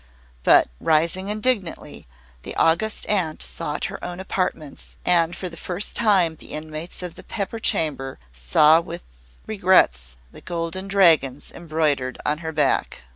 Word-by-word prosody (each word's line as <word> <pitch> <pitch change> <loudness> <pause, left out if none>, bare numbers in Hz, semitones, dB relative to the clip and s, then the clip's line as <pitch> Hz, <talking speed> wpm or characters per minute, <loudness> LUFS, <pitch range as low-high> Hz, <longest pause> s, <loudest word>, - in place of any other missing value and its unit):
But, - - +6
rising 165 +4 +1
indignantly, 210 - -2 0.3
the - - -8
August 175 +7 +1
Aunt 175 -7 0
sought 60 0 -4
her - - -6
own 175 +1 -5
apartments, 180 -6 -4
and 170 -1 +3
for 185 - -5
the 170 - -8
first 180 +4 -4
time 185 -8 +3
the - - -10
inmates 155 +3 -6
of 180 -2 -5
the - - -12
Pepper 225 +2 -4
Chamber 140 -9 -1 0.2
saw 150 - +4
with 165 - -8 0.4
regret 180 - +2 0.2
the - - -13
golden 175 +2 -4
dragons 160 -9 +3
embroidered 155 -6 -1
on 150 +1 0
her 160 -1 -5
back. 145 - 0
165 Hz, 140 wpm, -23 LUFS, 150-185 Hz, 0.4 s, But